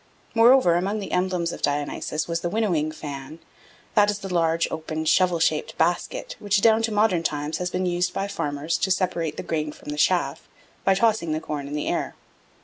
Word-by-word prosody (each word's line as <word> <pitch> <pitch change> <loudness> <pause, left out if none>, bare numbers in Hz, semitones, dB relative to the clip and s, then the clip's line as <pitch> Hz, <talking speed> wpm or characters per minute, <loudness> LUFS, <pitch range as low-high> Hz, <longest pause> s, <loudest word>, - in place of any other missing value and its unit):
Moreover, 235 -5 +6
among 190 +5 0
the 200 - -6
emblems 180 -2 0
of - - -8
Dionysus 145 +2 -1
was 170 0 -1
the 175 - -1
winnowing 175 -8 0
fan, 145 -1 -7 0.6
that 205 -1 +5
is 205 - 0
the 195 -2 -6
large 165 -1 +2
open 160 0 -4
shovel 180 +1 +3
shaped 155 -1 0
basket, 175 0 -1
which 205 -1 +2
down 220 0 +5
to 225 0 -1
modern 210 -5 +2
times 150 -1 -2
has 180 0 -1
been 185 +1 -2
used 175 0 0
by 195 - -2
farmers 150 -3 -2
to 190 - 0
separate 175 -4 0
the - - -4
grain 155 -2 -2
from 150 - -12
the 150 - -4
chaff 150 -4 +1 0.3
by 195 - +4
tossing 200 -6 +2
the 155 - -1
corn 150 -3 -5
in 145 - -5
the 150 - -2
air. - - -2
170 Hz, 200 wpm, -24 LUFS, 155-195 Hz, 0.6 s, Moreover